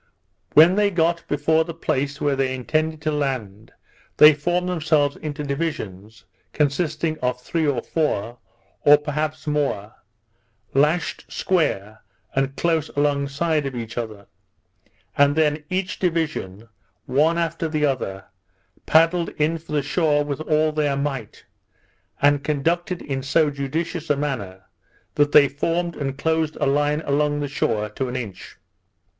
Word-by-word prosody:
When 160 +4 +8
they 205 -1 +4
got 170 -2 +1
before 160 +2 +2
the 165 0 -8
place 145 -3 -2
where 145 -1 +1
they 135 -1 0
intended 155 +5 -1
to 155 - 0
land, 125 -8 -3 0.5
they 150 0 +9
formed 175 +5 -1
themselves 155 -5 +1
into 150 -1 -5
divisions, 110 - -5 0.3
consisting 155 +2 0
of 125 -2 -1
three 160 +5 -1
or 130 -5 0
four, 120 -7 -2 0.4
or 145 0 +7
perhaps 150 +1 -3
more, 140 -9 -1 0.8
lashed 150 +6 0
square 110 - -1 0.3
and 135 0 0
close 160 -2 0
along 145 -1 +1
side 150 +1 0
of 135 - -6
each 115 -2 -6
other; 110 -4 -5 0.9
and 145 0 +4
then 150 -1 +1
each 185 +2 -2
division, 155 - -2 0.4
one 155 +5 +2
after 165 -1 -1
the 155 -1 0
other, 95 -9 -2 0.6
paddled 165 +2 +4
in 155 +2 +1
for 160 -1 -10
the 145 -2 +1
shore 145 0 +1
with 140 -2 -4
all 155 0 +2
their 150 -2 0
might, 135 -6 -4 0.7
and 145 0 +3
conducted 165 +5 -1
in 135 -2 -3
so 145 +3 +2
judicious 160 +4 -3
a 145 - +4
manner, 100 -11 -4 0.5
that 145 0 +2
they 145 -2 +7
formed 170 +5 -2
and 135 -2 -4
closed 160 +1 0
a - - -1
line 145 +2 +1
along, 145 0 0
the 145 - -2
shore, 110 -5 -1
to 130 +5 -4
an 125 - -5
inch. 110 -7 -7
145 Hz, 145 wpm, -22 LUFS, 135-160 Hz, 0.9 s, they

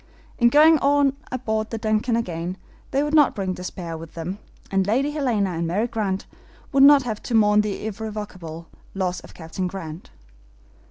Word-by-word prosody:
In 240 -1 +6
going 310 +4 +6
on 280 0 +3 0.3
board 220 0 -1
the 225 - -4
DUNCAN 220 +2 0
again 180 -4 -3 0.3
they 275 +2 +1
would 295 +1 -2
not 295 -3 +5
bring 190 -2 -2
despair 180 -2 -6
with 160 0 -10
them, 175 +4 -5 0.3
and 195 -1 +1
Lady 265 +7 +1
Helena 240 -10 0
and 165 -1 -2
Mary 200 +7 0
Grant 205 -5 -2 0.5
would 275 - +3
not 280 0 +8
have 220 -4 -4
to 240 - -3
mourn 210 -1 +5
the 210 0 -4
irrevocable 205 -6 -6 0.3
loss 185 -2 -1
of - - -15
Captain 170 +3 -4
Grant. 175 -3 -7
210 Hz, 170 wpm, -23 LUFS, 185-245 Hz, 0.5 s, not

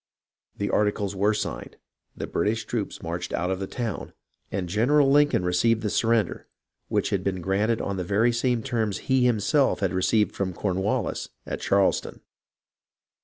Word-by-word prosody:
The 100 - -2
articles 105 -1 0
were 105 +3 +2
signed, - - -4 0.4
the - - -3
British 110 +2 -1
troops 110 -5 -4
marched 85 +1 -4
out 90 +1 0
of 95 - -2
the 95 - -3
town, 115 -1 -4 0.4
and 90 -2 -2
General 135 - +3
Lincoln 145 -10 +4
received 110 +6 +2
the 105 - -1
surrender 115 -1 +1 0.4
which - - 0
had - - 0
been 95 -2 -1
granted 105 +5 0
on 100 -1 -3
the 90 - -2
very 105 +6 +2
same 120 -1 0
terms 110 -6 -1
he 130 -1 +1
himself 135 +5 +2
had 95 -3 0
received 105 +3 +2
from 95 -2 -2
Cornwallis 95 +1 -1 0.2
at - - -5
Charleston. 100 -1 +1
105 Hz, 160 wpm, -25 LUFS, 95-115 Hz, 0.4 s, Lincoln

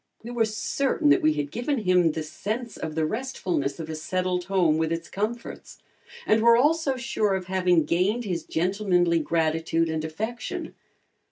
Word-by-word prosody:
We 235 - -7
were 235 -2 +2
certain 275 +7 0
that - - +5
we 155 0 +3
had 145 -1 -3
given 255 +5 -1
him 180 -4 +3
the 160 - -3
sense 215 +9 -5
of 155 -1 -5
the 160 -1 +1
restfulness 180 - -2
of 160 - -5
a 160 - -5
settled 180 +3 -2
home 175 -5 +2
with 160 0 0
its 165 0 -3
comforts, 220 +4 -5 0.5
and 215 +1 +3
were 235 0 +6
also 295 +1 +2
sure 215 -5 0
of 190 -1 -4
having 180 -3 +2
gained 200 +8 +1
his 175 -4 -2
gentlemanly 180 -1 +1
gratitude 165 +1 0
and 160 -1 -2
affection. 220 +10 -5
185 Hz, 170 wpm, -25 LUFS, 160-225 Hz, 0.5 s, were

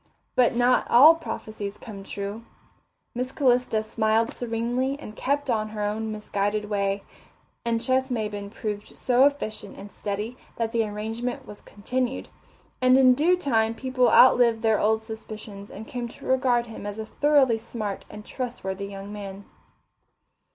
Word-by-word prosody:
But 245 -2 +3
not 245 +1 +3
all 285 +7 +9
prophecies 215 -10 -6
come 205 -4 -9
true. 200 +2 -5 0.7
Miss 250 +2 -3
Calista 250 -6 +2
smiled 220 +1 +1
serenely 245 +3 -2
and 215 -7 -9
kept 285 +2 -1
on 215 -3 0
her 215 -1 -4
own 215 +1 -2
misguided 210 0 -2
way. 200 -1 0 0.6
And 230 -1 0
Ches 260 +2 +1
Maybin 210 -4 -3
proved 210 -1 -6
so 255 +1 +4
efficient 215 -8 -2
and 200 +1 -10
steady 210 +4 -4 0.2
that 230 -1 -2
the 230 -1 +2
arrangement 225 +4 -4
was 210 - -11
continued, 255 +5 -3 0.5
and 255 0 +6
in 255 -1 +7
due 330 +7 +3
time 225 -8 +1
people 255 0 +2
outlived 235 -3 +6
their 220 -1 +3
old 220 +1 +2
suspicions 215 -2 -9
and 215 - -9
came 245 -1 -4
to 235 - -13
regard 255 -2 +2
him 225 -3 -8
as 205 0 -5
a 220 - -4
thoroughly 270 -2 +3
smart 215 -3 -5
and 210 0 -10
trustworthy 200 -6 -4
young 200 +1 -8
man. 200 -1 -8
225 Hz, 150 wpm, -25 LUFS, 210-250 Hz, 0.7 s, all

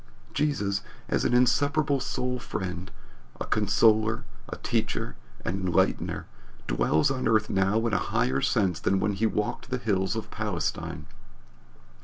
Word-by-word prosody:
Jesus, 135 -10 0 0.3
as - - 0
an 120 - +3
inseparable 140 +3 +3
soul 125 -1 -2
friend 95 -4 -4 0.5
a - - -3
consoler, 110 0 +3 0.3
a - - -4
teacher, 60 - -1 0.3
an 85 - 0
enlightener 90 -2 +1 0.4
dwells 75 - +2
on 130 -1 -1
earth 110 -1 +2
now 100 +4 +2
in 115 - 0
a 100 - +3
higher 65 +2 +1
sense 90 -5 +1
than 95 - +1
when 100 +1 +1
he 110 +3 +1
walked 105 +4 -2
the 125 - 0
hills 100 -4 0
of 110 - -5
Palestine. 95 -7 -3
105 Hz, 140 wpm, -27 LUFS, 95-125 Hz, 0.5 s, an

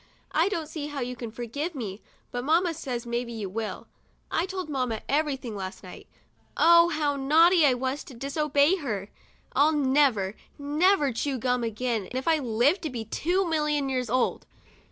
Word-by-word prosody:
I 330 +5 +2
don't 335 -6 -2
see 305 -1 -6
how 290 -2 -5
you 250 0 -3
can 235 -2 -6
forgive 245 +9 -5
me, 210 -6 -5 0.3
but 245 0 -3
mamma 335 +4 +2
says 255 -6 -5
maybe 235 0 -3
you 220 -4 -4
will. 220 +1 -4 0.5
I 345 - 0
told 375 -3 -4
mamma 255 -6 -2
everything 275 -6 -1
last 190 0 -6
night. - - -11 0.5
Oh, 340 +1 +6
how 300 -3 0
naughty 315 +4 +5
I 255 - +3
was 260 +3 -2
to 265 - -11
dis 275 +4 -6 0.2
>bey 290 +7 +4
her! 210 - -4 0.4
I'll 305 +2 +4
never, 265 -9 +2 0.2
never 295 0 +2
chew 265 +4 -2
gum 250 0 0
again 225 -2 -2
f 260 +3 -3
I 320 -1 +4
live 250 - +2
to 315 - -3
be 235 -4 -5
two 355 - 0
million 300 -3 0
years 255 -3 -1
old. 255 +2 0
275 Hz, 175 wpm, -27 LUFS, 240-310 Hz, 0.5 s, Oh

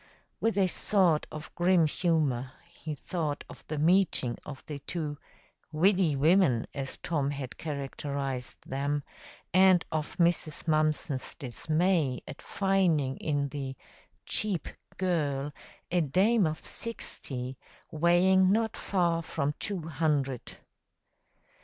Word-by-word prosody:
With 225 -2 +1
a 195 - +5
sort 180 -3 +3
of 155 0 -8
grim 175 -1 +4
humor, 145 -6 0
he 160 -2 -7
thought 155 -2 -3
of - - -12
the 155 - -3
meeting 160 -6 +2
of 135 -3 -8
the 150 -2 -6
two 150 -1 -4 0.5
"widdy 175 0 +3
women," 145 -4 +4
as 135 -2 -4
Tom 145 -5 -1
had 140 -3 -5
characterized 140 -3 -4
them, 140 +2 -1 0.5
and 185 -2 +6
of 155 -1 -3
Mrs. 170 -2 +1
Mumpson's 155 -3 0
dismay 155 +1 0
at - - -9
finding 180 -9 +1
in 145 -2 -1
the 135 -1 -5 0.5
"cheap 205 -6 -1 0.3
girl" 145 -6 0 0.4
a 175 0 +3
dame 190 - +3
of 155 0 -5
sixty, 130 - -5 0.3
weighing 180 +4 +4
not 220 +1 +1
far 170 -3 +1
from 145 -3 -2
two 195 -5 -2
hundred. 145 -5 -1
155 Hz, 115 wpm, -29 LUFS, 140-180 Hz, 0.5 s, and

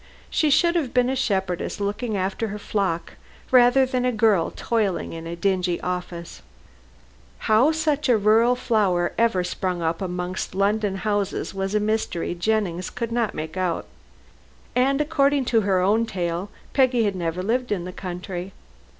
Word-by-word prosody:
She 310 - +2
should 340 +4 +4
have 285 -8 -1
been 250 +1 +3
a - - -1
shepherdess 190 -9 -1
looking 205 +2 -2
after 195 +4 -1
her 210 0 -5
flock 195 -5 -2 0.3
rather 255 +1 +6
than 255 -1 -1
a 250 - +2
girl 215 -7 +3
toiling 215 -6 -1
in 165 0 -7
a 170 - -4
dingy 180 -1 0
office. 180 - -5 1.0
How 225 +8 +5
such 305 -3 0
a 240 - +5
rural 220 +4 +4
flower 200 -8 +1
ever 230 -6 +2
sprung 180 -1 -2
up 165 +2 -1
amongst 180 0 -4
London 200 0 +1
houses 205 -1 -2
was 195 +1 -2
a - - +4
mystery 210 -5 -1
Jennings 185 -1 -1
could 235 -1 -4
not 230 -2 0
make 155 +2 -5
out. 180 -3 -1 0.9
And 270 +3 +3
according 285 -3 +2
to 225 - +5
her 195 -2 +2
own 215 +5 +2
tale, 175 0 -3 0.2
Peggy 255 -3 +3
had 200 -2 0
never 175 0 -2
lived 245 +4 -1
in 180 -4 -1
the 180 - -7
country. 180 0 -6
205 Hz, 160 wpm, -23 LUFS, 180-240 Hz, 1.0 s, rather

